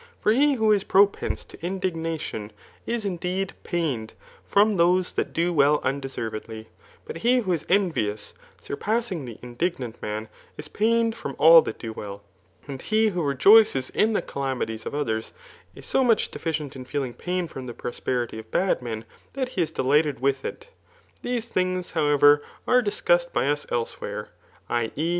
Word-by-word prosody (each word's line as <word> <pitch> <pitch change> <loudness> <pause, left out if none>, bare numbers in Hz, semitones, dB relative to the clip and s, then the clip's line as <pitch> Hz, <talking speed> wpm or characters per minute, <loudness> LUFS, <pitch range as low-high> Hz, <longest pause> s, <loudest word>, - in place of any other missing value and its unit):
For 215 - +2
he 280 +5 +4
who 220 -3 +3
is 205 -2 +3
propense 200 +1 +2
to - - -15
indignation, 165 - -3 0.4
is 230 -2 -2
indeed 185 0 -2
pained 140 -11 -2 0.3
from 205 0 +3
those 180 +2 +3
that - - -2
do 175 +1 0
well 145 -1 +4
undeservedly; 115 -5 -4 0.4
but - - -6
he 240 +8 +3
who 190 -5 -2
is 165 - -3
envious, 160 - 0 0.3
surpassing 210 - -2
the 115 -3 -8
indignant 125 -1 -3
man, 105 +1 -4 0.3
is 150 - -7
pained 230 +4 +1
from 140 - -6
all 165 +1 +9
that - - -5
do 115 -2 -6
well; 100 -1 -8 0.4
and 135 -2 -6
he 220 0 +2
who 180 -3 -2
rejoices 145 - +5
in 220 +1 +2
the - - 0
calamities 130 -5 -3
of - - -4
others, 110 -7 -2 0.4
is - - -11
so 265 - +2
much 230 -4 +2
deficient 155 -4 -4
in 130 - -7
feeling 130 -1 -3
pain 180 +3 -2
[from 130 -4 -8
the 120 - -6
prosperity 120 -2 -3
of 110 0 -11
bad 185 +2 +1
men,] 115 -2 -5 0.3
that 260 -2 -2
he 195 - -2
is 160 - 0
delighted 150 -2 +1
with 135 +1 0
it. 470 +1 -7 0.5
These 240 -1 -2
things, 185 -2 -1
how 155 -3 +1
ever, 145 0 +6 0.3
are 250 0 +5
discussed - - +1
by - - 0
us 145 0 -1
elsewhere, 120 -1 -4 0.4
[i. 120 -2 -1
e. 160 +3 -1
160 Hz, 170 wpm, -25 LUFS, 130-200 Hz, 0.5 s, all